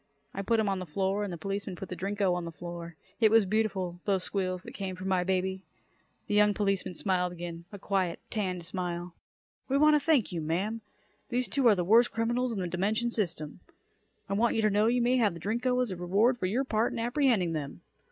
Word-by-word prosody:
I 195 Hz, -, -3 dB
put 225 Hz, +3 st, +1 dB
him 215 Hz, -, +1 dB
on 195 Hz, -1 st, 0 dB
the 185 Hz, -, -6 dB
floor 195 Hz, +5 st, 0 dB
and 200 Hz, -, -3 dB
the 175 Hz, -, -5 dB
policeman 195 Hz, +2 st, -4 dB
put 190 Hz, +1 st, -8 dB
the 180 Hz, -, -4 dB
Drinko 195 Hz, +1 st, 0 dB
on 175 Hz, 0 st, -2 dB
the 170 Hz, -, -5 dB
floor. 170 Hz, 0 st, -8 dB, 0.2 s
It 220 Hz, -2 st, +6 dB
was 225 Hz, -1 st, +5 dB
beautiful, 190 Hz, -4 st, -1 dB
those 195 Hz, -3 st, +1 dB
squeals 185 Hz, -2 st, -2 dB
that -, -, -9 dB
came 190 Hz, -1 st, -5 dB
from 185 Hz, +1 st, -6 dB
my 185 Hz, -1 st, +2 dB
baby. 190 Hz, +1 st, -1 dB, 0.6 s
The 205 Hz, -, -3 dB
young 210 Hz, 0 st, +4 dB
policeman 195 Hz, -3 st, -1 dB
smiled 180 Hz, -2 st, 0 dB
again, 170 Hz, -1 st, -7 dB
a 200 Hz, -, -7 dB
quiet, 190 Hz, -3 st, -1 dB
tanned 185 Hz, -5 st, -2 dB
smile. 175 Hz, -1 st, -4 dB, 0.6 s
"We 275 Hz, -, +2 dB
want 305 Hz, +1 st, +6 dB
to 300 Hz, -, +5 dB
thank 300 Hz, -, +3 dB
you, 170 Hz, -2 st, -3 dB
ma'am. 190 Hz, +9 st, -1 dB, 0.5 s
These 250 Hz, +1 st, -1 dB
two 275 Hz, -4 st, +2 dB
are 215 Hz, -, +6 dB
the 180 Hz, -, 0 dB
worst 230 Hz, +6 st, +5 dB
criminals 240 Hz, +2 st, 0 dB
in 205 Hz, -4 st, -2 dB
the 180 Hz, -, -2 dB
dimension 210 Hz, +7 st, 0 dB
system. 165 Hz, -9 st, -2 dB, 0.7 s
I 195 Hz, -, -2 dB
want 225 Hz, +4 st, +2 dB
you 225 Hz, -, +1 dB
to 215 Hz, -, +3 dB
know 210 Hz, +2 st, +3 dB
you 245 Hz, +1 st, +2 dB
may 250 Hz, +2 st, +3 dB
have 210 Hz, -8 st, +2 dB
the -, -, -8 dB
Drinko 240 Hz, +7 st, 0 dB
as 240 Hz, -, -4 dB
a -, -, -3 dB
reward 200 Hz, +8 st, +2 dB
for 210 Hz, -6 st, -2 dB
your 240 Hz, +8 st, 0 dB
part 230 Hz, -3 st, 0 dB
in -, -, -5 dB
apprehending 235 Hz, -, +2 dB
them. 145 Hz, -3 st, -5 dB
195 Hz, 230 wpm, -29 LUFS, 180-225 Hz, 0.7 s, It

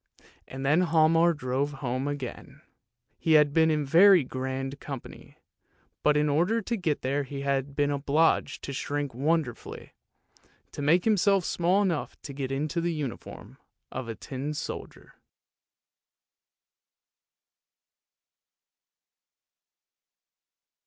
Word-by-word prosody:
And 135 Hz, +1 st, -6 dB
then 150 Hz, +6 st, +4 dB
Hialmar 165 Hz, +1 st, +4 dB
drove 140 Hz, +1 st, -2 dB
home 130 Hz, -1 st, -3 dB
again; 145 Hz, -4 st, -7 dB, 0.6 s
he 160 Hz, -, +2 dB
had 150 Hz, -2 st, +5 dB
been 160 Hz, 0 st, +4 dB
in 150 Hz, -2 st, 0 dB
very 180 Hz, +4 st, +6 dB
grand 130 Hz, +2 st, -4 dB
company, 135 Hz, -4 st, -9 dB, 0.6 s
but 150 Hz, 0 st, +3 dB
in 150 Hz, 0 st, +2 dB
order 175 Hz, +10 st, +2 dB
to 235 Hz, +2 st, -2 dB
get 165 Hz, -8 st, -2 dB
there 135 Hz, +3 st, 0 dB
he 140 Hz, 0 st, -6 dB
had 140 Hz, 0 st, -1 dB
been 145 Hz, 0 st, +1 dB
obliged 145 Hz, +3 st, +1 dB
to 140 Hz, -, -5 dB
shrink 145 Hz, 0 st, -3 dB
wonderfully, 145 Hz, -1 st, -2 dB, 0.8 s
to -, -, -7 dB
make 165 Hz, +5 st, +3 dB
himself 200 Hz, -4 st, +3 dB
small 180 Hz, +6 st, +2 dB
enough 170 Hz, -6 st, -2 dB
to 140 Hz, -, -7 dB
get 135 Hz, -1 st, -4 dB
into 150 Hz, +4 st, -2 dB
the 170 Hz, +1 st, 0 dB
uniform 145 Hz, -6 st, -7 dB, 0.3 s
of 130 Hz, -2 st, -5 dB
a 115 Hz, -, -5 dB
tin 140 Hz, +5 st, -5 dB
soldier. -, -, -7 dB
145 Hz, 115 wpm, -27 LUFS, 135-165 Hz, 0.8 s, very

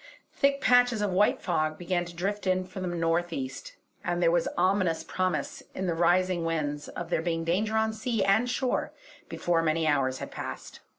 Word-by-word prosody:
Thick 280 Hz, 0 st, +2 dB
patches 245 Hz, -3 st, +4 dB
of 205 Hz, -, 0 dB
white 200 Hz, +3 st, +2 dB
fog 155 Hz, -3 st, 0 dB
began 175 Hz, 0 st, -1 dB
to 175 Hz, 0 st, -10 dB
drift 195 Hz, +3 st, -2 dB
in 185 Hz, 0 st, +2 dB
from 185 Hz, 0 st, -5 dB
the 175 Hz, -, -3 dB
north 170 Hz, +1 st, 0 dB
east, 130 Hz, -3 st, -5 dB, 0.3 s
and 175 Hz, 0 st, -1 dB
there 170 Hz, -1 st, +4 dB
was 170 Hz, -1 st, +2 dB
ominous 185 Hz, -2 st, +2 dB
promise 185 Hz, -6 st, -2 dB
in 190 Hz, -, -2 dB
the 175 Hz, -, 0 dB
rising 175 Hz, +1 st, +2 dB
wind 150 Hz, -3 st, -2 dB
of 175 Hz, 0 st, -5 dB
there -, -, +1 dB
being 165 Hz, -1 st, -1 dB
danger 210 Hz, +6 st, 0 dB
on 220 Hz, 0 st, +1 dB
sea 220 Hz, -1 st, -1 dB
and 220 Hz, +5 st, +3 dB
shore 255 Hz, 0 st, -1 dB, 0.4 s
before 170 Hz, -1 st, +1 dB
many 160 Hz, 0 st, +1 dB
hours 135 Hz, -4 st, +1 dB
had -, -, -7 dB
passed. -, -, -7 dB
175 Hz, 190 wpm, -28 LUFS, 165-200 Hz, 0.4 s, patches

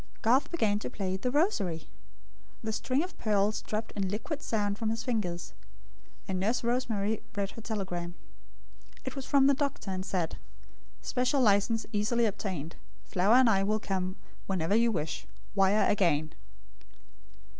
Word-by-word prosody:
Garth 255 Hz, +5 st, +4 dB
began 215 Hz, -12 st, +1 dB
to -, -, -4 dB
play 190 Hz, -3 st, -2 dB
The 220 Hz, +7 st, -1 dB
Rosary. 245 Hz, -, +1 dB, 0.8 s
The 220 Hz, 0 st, -2 dB
string 260 Hz, +6 st, +1 dB
of 365 Hz, -, -7 dB
pearls 210 Hz, -1 st, +2 dB
dropped 215 Hz, +1 st, -3 dB
in 195 Hz, -2 st, -2 dB
liquid 255 Hz, -, -3 dB
sound 205 Hz, -5 st, -1 dB
from 220 Hz, -, 0 dB
his 225 Hz, +1 st, -2 dB
fingers; 185 Hz, -8 st, -2 dB, 0.7 s
and 190 Hz, -2 st, -1 dB
Nurse 220 Hz, +7 st, +1 dB
Rosemary 225 Hz, -4 st, 0 dB
read 200 Hz, -1 st, -1 dB
her 230 Hz, -, -10 dB
telegram. 185 Hz, -6 st, -4 dB, 0.9 s
It -, -, -4 dB
was 270 Hz, -2 st, -5 dB
from 275 Hz, -1 st, +5 dB
the 280 Hz, -, +6 dB
doctor, 275 Hz, -7 st, -2 dB
and 185 Hz, 0 st, -2 dB
said: 180 Hz, -4 st, -2 dB, 0.7 s
SPECIAL 255 Hz, -, +1 dB
LICENSE 220 Hz, +1 st, +3 dB
EASILY 230 Hz, +3 st, +2 dB
OBTAINED. 185 Hz, -7 st, -3 dB, 0.3 s
FLOWER 190 Hz, -, +3 dB
AND 255 Hz, -2 st, +7 dB
I 195 Hz, -2 st, +3 dB
WILL 215 Hz, +2 st, +1 dB
COME 190 Hz, -2 st, -2 dB, 0.3 s
WHENEVER 190 Hz, 0 st, +1 dB
YOU 230 Hz, +1 st, +4 dB
WISH. 160 Hz, -6 st, -3 dB, 0.3 s
WIRE 200 Hz, +1 st, +4 dB
AGAIN. 155 Hz, -6 st, +2 dB
210 Hz, 150 wpm, -30 LUFS, 190-235 Hz, 0.9 s, AND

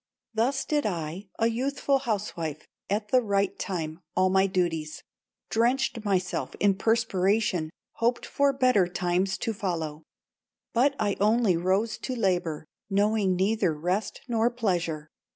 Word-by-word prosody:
"Thus 240 Hz, +5 st, +1 dB
did 295 Hz, -5 st, +1 dB
I, 170 Hz, +1 st, -4 dB
a 225 Hz, -, +2 dB
youthful 270 Hz, +4 st, +1 dB
housewife, 195 Hz, -, -3 dB, 0.2 s
At 210 Hz, +2 st, -1 dB
the 255 Hz, +2 st, +4 dB
right 200 Hz, -3 st, 0 dB
time, 160 Hz, -4 st, -3 dB, 0.2 s
all 185 Hz, 0 st, +4 dB
my 190 Hz, +1 st, +4 dB
duties, 165 Hz, -5 st, -1 dB, 0.5 s
Drenched 240 Hz, 0 st, +1 dB
myself 185 Hz, -3 st, -1 dB
in 200 Hz, -1 st, +4 dB
perspiration, 200 Hz, -5 st, +1 dB, 0.3 s
Hoped 235 Hz, +1 st, +1 dB
for 280 Hz, 0 st, +2 dB
better 255 Hz, -9 st, +3 dB
times 180 Hz, +2 st, 0 dB
to 225 Hz, -, -2 dB
follow; 165 Hz, -7 st, -3 dB, 0.7 s
But 265 Hz, +4 st, +3 dB
I 205 Hz, -2 st, 0 dB
only 210 Hz, -2 st, +3 dB
rose 190 Hz, +6 st, 0 dB
to 255 Hz, -, -4 dB
labor, 175 Hz, -8 st, 0 dB, 0.2 s
Knowing 200 Hz, -1 st, +2 dB
neither 190 Hz, -3 st, +1 dB
rest 180 Hz, +7 st, -2 dB
nor 230 Hz, -1 st, +2 dB
pleasure. 175 Hz, -10 st, -1 dB
200 Hz, 135 wpm, -27 LUFS, 180-230 Hz, 0.7 s, the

